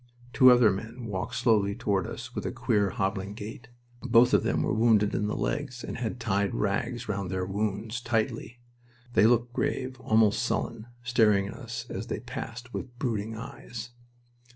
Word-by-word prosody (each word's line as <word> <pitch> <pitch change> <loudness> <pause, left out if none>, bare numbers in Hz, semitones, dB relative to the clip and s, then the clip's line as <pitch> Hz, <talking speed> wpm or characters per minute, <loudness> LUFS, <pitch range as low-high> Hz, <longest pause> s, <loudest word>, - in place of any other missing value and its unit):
Two 130 +3 +8
other 120 -4 +6
men 110 +5 -6
walked 95 -4 -4
slowly 105 -4 +2
toward 100 -6 0
us - - -7
with - - -4
a - - -2
queer, 100 -2 +1
hobbling 95 +1 -2
gait. 110 +2 -8 0.3
Both 125 -1 +5
of - - +6
them - - 0
were - - 0
wounded 110 -2 +3
in 105 - 0
the 105 - -2
legs, 125 -4 -2
and - - -5
had 120 +1 -3
tied 100 -4 0
rags 120 +4 -1
round 100 -3 -2
their 95 0 -1
wounds 105 +4 -2
tightly. 115 0 -1 0.6
They 110 - +6
looked 120 +1 +2
grave, 130 +1 -2
almost 110 -2 +3
sullen, 115 -2 -2 0.2
staring 110 -5 +3
at - - -6
us 115 -3 -6
as 105 +2 -5
they - - -3
passed, 120 +1 -7
with 120 -1 -6
brooding 110 -4 -2
eyes. 120 -1 -8
115 Hz, 175 wpm, -28 LUFS, 105-120 Hz, 0.6 s, Two